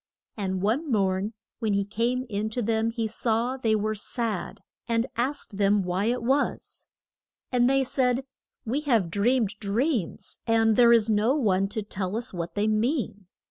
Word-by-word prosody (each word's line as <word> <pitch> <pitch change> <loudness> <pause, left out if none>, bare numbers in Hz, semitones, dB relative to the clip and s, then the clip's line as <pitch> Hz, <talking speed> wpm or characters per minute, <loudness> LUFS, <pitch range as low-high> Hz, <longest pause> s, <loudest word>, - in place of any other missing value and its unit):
And 190 -3 -2
one 260 +10 0
morn 195 0 0 0.2
when 220 -2 0
he 200 0 +1
came 240 +5 -1
in 210 0 -2
to 245 - +1
them 225 +1 +1
he 230 -1 -2
saw 230 +3 -1
they 225 -4 +1
were 215 +1 0
sad, 215 -2 -3 0.3
and 230 0 +1
asked 240 -4 -2
them 200 0 +3
why 180 +3 -1
it 240 +1 0
was. 270 +4 -1 0.6
And 245 0 +3
they 270 0 +3
said, 255 0 0 0.4
We 245 +6 0
have 230 - +1
dreamed 215 +1 +1
dreams, 220 - -2
and 225 -1 +3
there 235 0 +6
is 230 -2 +5
no 220 +4 +2
one 195 -8 +2
to 215 +1 -4
tell 195 0 -3
us 235 -2 -4
what 170 -1 -5
they 210 +1 +1
mean. 215 - -1
225 Hz, 170 wpm, -26 LUFS, 205-245 Hz, 0.6 s, there